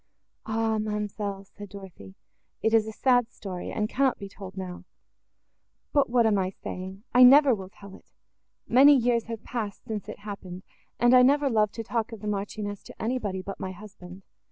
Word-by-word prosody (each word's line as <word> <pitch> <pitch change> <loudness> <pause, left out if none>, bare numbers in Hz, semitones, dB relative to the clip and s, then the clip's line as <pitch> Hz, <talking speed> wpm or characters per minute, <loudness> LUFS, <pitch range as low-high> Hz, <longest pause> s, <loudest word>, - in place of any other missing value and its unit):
"Ah, 220 0 0
ma'amselle!" 210 -2 -3
said 205 +1 -12
Dorothée, 185 - -12 0.5
"it 220 - +2
is 220 -1 +4
a - - -4
sad 245 +1 +2
story, 185 -6 -7
and 210 -1 -1
cannot 265 +2 +1
be 200 - -7
told 195 -1 -11
now: 185 -1 -6 1.1
but 285 -4 +3
what 240 -1 +3
am 210 -3 +3
I 185 -1 0
saying? 190 +1 -8
I 250 - +6
never 270 +2 +8
will 190 -4 -5
tell 200 -1 -14
it. - - -17 0.6
Many 275 +4 +7
years 235 -2 +1
have 225 -2 -7
passed, 215 -5 -5
since 210 -2 -5
it - - -7
happened; 190 -3 -8 0.4
and 240 +1 +5
I 250 - +8
never 280 +2 +3
loved 210 -2 +1
to 225 - -4
talk 230 +1 -2
of 225 -3 -9
the 210 - -6
Marchioness 205 0 -4
to - - -13
anybody, 215 -6 -2
but 195 +1 -7
my 185 - -5
husband. 190 -1 -12
210 Hz, 185 wpm, -27 LUFS, 195-235 Hz, 1.1 s, never